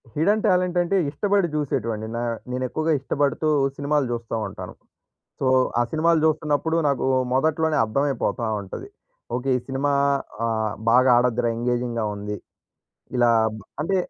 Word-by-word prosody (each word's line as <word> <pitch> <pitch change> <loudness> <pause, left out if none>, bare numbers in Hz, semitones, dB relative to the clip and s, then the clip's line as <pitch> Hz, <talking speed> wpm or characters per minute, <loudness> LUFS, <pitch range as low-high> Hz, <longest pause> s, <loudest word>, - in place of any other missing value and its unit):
Hidden 205 +8 +2
talent 180 -2 +2
అంటే, 175 +3 0
ఇష్టపడి 200 +4 +1
చూసేటివండి. 115 -7 -2
నా - - -2 0.3
నేను 130 +1 -2
ఎక్కువగా 155 +5 -1
ఇష్టపడుతూ 145 +3 -1 0.3
సినిమాలు 145 0 +1
జూస్తా 115 -1 -4
ఉంటాను. - - -8 0.7
సో, - - -1 0.3
ఆ - - +4
సినిమాలు 160 +1 +3
జూస్తున్నప్పుడు 155 +1 +1
నాకు 140 -2 0 0.3
మొదట్లోనే 155 +3 +1
అర్థమైపోతా 130 0 -1 0.2
ఉంటది. 95 - -8 0.5
ఓకే. 125 +2 -2
ఈ - - -3
సినిమా 135 +2 0 0.5
ఆహ్, 110 -2 -1 0.2
బాగా 125 +2 +5
ఆడ‌ద్ది‌ర 120 -1 +2
ఎంగేజింగ్‌గా 120 -1 -1
ఉంది. 105 0 -5 0.8
ఇలా 120 -1 +4 0.5
అంటే, 190 +6 0
140 Hz, 130 wpm, -23 LUFS, 120-160 Hz, 0.8 s, బాగా